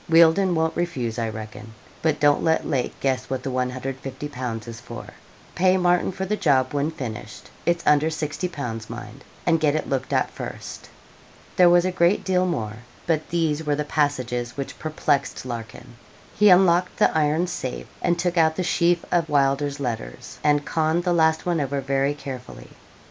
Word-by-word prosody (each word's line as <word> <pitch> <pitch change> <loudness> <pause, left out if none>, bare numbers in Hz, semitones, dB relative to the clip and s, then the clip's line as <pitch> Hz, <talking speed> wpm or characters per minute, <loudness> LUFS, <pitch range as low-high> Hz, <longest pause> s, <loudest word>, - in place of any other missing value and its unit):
Wealdon 170 +3 +5
won't 160 0 0
refuse, 130 -10 -2
I 115 -1 -1
reckon 110 0 -9 0.3
but 160 -2 +1
don't 145 -1 +3
let 160 0 +2
Lake 135 -5 -2
guess 130 -2 -1
what 130 -1 -3
the 135 - -3
150_l._ 130 -1 -4
is 115 0 -7
for. 120 -2 -9 0.5
Pay 185 +1 +3
Martin 180 0 +2
for 190 +1 -4
the 210 +3 0
job 140 -9 +2
when 145 +1 0
finished; 110 -8 -7 0.2
it 170 0 +3
is 170 - -13
under 150 +1 +4
60_l._. 150 -7 -4
mind; 115 +2 -9 0.2
and 165 -2 +3
get 150 -1 +2
it 155 - -2
looked 130 -2 -2
at - - +1
first.' - - -8 0.7
There 180 -1 +6
was 175 0 +5
a 185 - +1
great 175 +2 +2
deal 185 -1 +1
more, 110 -11 -3 0.3
but 160 -2 0
these 160 -2 0
were 150 -1 0
the 150 - -1
passages 130 -6 -1
which 140 - -5
perplexed 150 -4 -1
Larkin. 120 0 -8 0.4
He 210 0 +5
unlocked 180 -1 +4
the - - +3
iron 155 +2 +2
safe, 175 -8 -5 0.2
and 175 - +1
took 175 0 0
out 160 -1 +4
the 185 - -1
sheaf 170 -1 +2
of 170 -2 +1
Wylder's 140 0 +1
letters, 115 - -5
and 145 -1 +3
conned 160 +2 +1
the 175 -1 +1
last 160 -1 +2
one 170 -3 +1
over 140 0 -1
very 135 +1 0
carefully. 130 -3 -8
150 Hz, 175 wpm, -24 LUFS, 130-170 Hz, 0.7 s, There